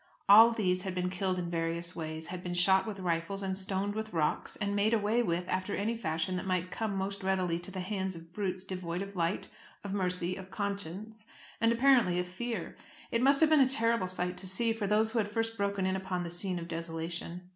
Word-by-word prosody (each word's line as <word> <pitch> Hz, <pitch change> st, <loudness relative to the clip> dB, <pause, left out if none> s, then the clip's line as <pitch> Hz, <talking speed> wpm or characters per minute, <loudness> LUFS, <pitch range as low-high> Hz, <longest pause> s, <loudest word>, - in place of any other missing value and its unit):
All 220 Hz, +3 st, +10 dB
these 185 Hz, -6 st, +1 dB
had 185 Hz, -1 st, -4 dB
been 180 Hz, 0 st, -1 dB
killed 185 Hz, 0 st, -1 dB
in 175 Hz, -1 st, -3 dB
various 170 Hz, +1 st, -2 dB
ways, 160 Hz, 0 st, -5 dB
had 180 Hz, 0 st, -5 dB
been 175 Hz, -1 st, -4 dB
shot 190 Hz, +2 st, +4 dB
with 205 Hz, -3 st, -5 dB
rifles, 180 Hz, +2 st, -1 dB
and 190 Hz, -1 st, -1 dB
stoned 195 Hz, +1 st, -2 dB
with 220 Hz, -1 st, -4 dB
rocks, 155 Hz, -3 st, 0 dB
and 200 Hz, -1 st, -1 dB
made 210 Hz, +3 st, +3 dB
away 220 Hz, +2 st, +2 dB
with, 180 Hz, -5 st, -1 dB
after 185 Hz, +2 st, -1 dB
any 220 Hz, +3 st, 0 dB
fashion 180 Hz, -3 st, -1 dB
that 185 Hz, -, -4 dB
might 185 Hz, -1 st, 0 dB
come 220 Hz, -3 st, -2 dB
most 195 Hz, +1 st, -2 dB
readily 185 Hz, -3 st, +1 dB
to 175 Hz, -, -9 dB
the 190 Hz, -1 st, -4 dB
hands 190 Hz, -1 st, -2 dB
of 165 Hz, 0 st, -12 dB
brutes 185 Hz, -3 st, -2 dB
devoid 180 Hz, -1 st, -4 dB
of 200 Hz, 0 st, -9 dB
light, 170 Hz, +1 st, -1 dB, 0.3 s
of 200 Hz, -1 st, -4 dB
mercy, 180 Hz, -2 st, -1 dB
of 190 Hz, -1 st, -9 dB
conscience, 200 Hz, +2 st, -5 dB, 0.3 s
and 230 Hz, 0 st, +5 dB
apparently 235 Hz, -7 st, +4 dB
of 180 Hz, 0 st, -1 dB
fear. 230 Hz, +6 st, -4 dB, 0.4 s
It 230 Hz, -, +1 dB
must 275 Hz, +3 st, +4 dB
have 315 Hz, -1 st, +5 dB
been 310 Hz, -, +7 dB
a 260 Hz, -, +5 dB
terrible 230 Hz, -6 st, +2 dB
sight 180 Hz, 0 st, -3 dB
to 190 Hz, +1 st, -7 dB
see, 225 Hz, +5 st, +1 dB
for 220 Hz, -3 st, -2 dB
those 215 Hz, +2 st, +3 dB
who 230 Hz, -, +1 dB
had 205 Hz, -1 st, 0 dB
first 225 Hz, +1 st, -1 dB
broken 200 Hz, -2 st, 0 dB
in 190 Hz, 0 st, +1 dB
upon 190 Hz, -2 st, -2 dB
the 170 Hz, -, -5 dB
scene 180 Hz, +1 st, -3 dB
of 170 Hz, -1 st, -5 dB
desolation. 170 Hz, +1 st, -4 dB
190 Hz, 225 wpm, -31 LUFS, 180-210 Hz, 0.4 s, All